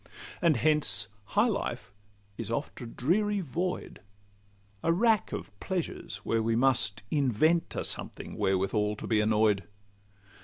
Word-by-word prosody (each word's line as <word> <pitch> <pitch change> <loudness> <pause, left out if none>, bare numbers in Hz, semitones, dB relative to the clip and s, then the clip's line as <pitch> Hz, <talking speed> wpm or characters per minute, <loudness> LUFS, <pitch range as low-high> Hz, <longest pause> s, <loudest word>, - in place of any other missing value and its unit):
And 165 -7 +4
hence 150 -6 +2 0.2
high 210 - +2
life 120 - -3 0.4
is - - -5
oft 130 +4 -3
a 120 - -5
dreary 200 - +1
void, 180 +2 -3 0.8
A 165 - +2
rack 215 +3 +3
of - - -5
pleasures, 185 -3 -3
where 115 0 +1
we 115 +1 +1
must 120 -4 +2
invent 155 +4 +2
A - - -1
something - - -3
wherewithal 100 +2 +1
to - - -7
be 110 -1 +2
annoy'd. 105 -3 +2
130 Hz, 130 wpm, -29 LUFS, 105-170 Hz, 0.8 s, And